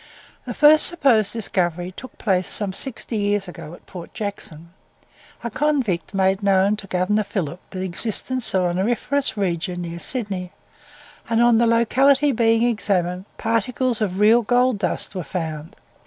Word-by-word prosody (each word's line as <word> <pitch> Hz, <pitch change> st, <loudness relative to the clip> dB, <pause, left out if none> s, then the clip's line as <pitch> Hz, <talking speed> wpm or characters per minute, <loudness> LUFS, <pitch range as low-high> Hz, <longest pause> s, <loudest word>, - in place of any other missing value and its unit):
The -, -, -6 dB
first 305 Hz, +1 st, +6 dB
supposed 260 Hz, -, +2 dB
discovery 180 Hz, -5 st, -2 dB
took 260 Hz, -, -11 dB
place 185 Hz, -4 st, 0 dB
some 200 Hz, -3 st, +3 dB
sixty 235 Hz, 0 st, 0 dB
years 205 Hz, -1 st, 0 dB
ago, 170 Hz, -2 st, -9 dB
at -, -, -21 dB
Port 175 Hz, -3 st, -11 dB
Jackson. 170 Hz, -7 st, -7 dB, 0.7 s
A 235 Hz, -, -4 dB
convict 235 Hz, -, -1 dB
made 190 Hz, +1 st, +1 dB
known 200 Hz, +1 st, +3 dB
to 200 Hz, -, -8 dB
Governor 185 Hz, +3 st, 0 dB
Phillip 180 Hz, -5 st, -4 dB
the 185 Hz, 0 st, -5 dB
existence 220 Hz, +7 st, -2 dB
of 185 Hz, -, +2 dB
an 175 Hz, 0 st, -1 dB
auriferous 240 Hz, +6 st, -1 dB
region 175 Hz, -2 st, -2 dB
near 170 Hz, 0 st, -6 dB
Sydney, 195 Hz, -6 st, -3 dB, 0.8 s
and 230 Hz, 0 st, +1 dB
on 240 Hz, -1 st, +4 dB
the 235 Hz, -, +3 dB
locality 265 Hz, +5 st, +3 dB
being 225 Hz, -1 st, +2 dB
examined, 190 Hz, -6 st, -1 dB
particles 230 Hz, +1 st, -1 dB
of 190 Hz, -2 st, -2 dB
real 220 Hz, +3 st, +5 dB
gold 245 Hz, 0 st, +1 dB
dust 190 Hz, -, -2 dB
were 185 Hz, -3 st, -4 dB
found. 155 Hz, 0 st, -6 dB
205 Hz, 155 wpm, -21 LUFS, 180-235 Hz, 0.8 s, first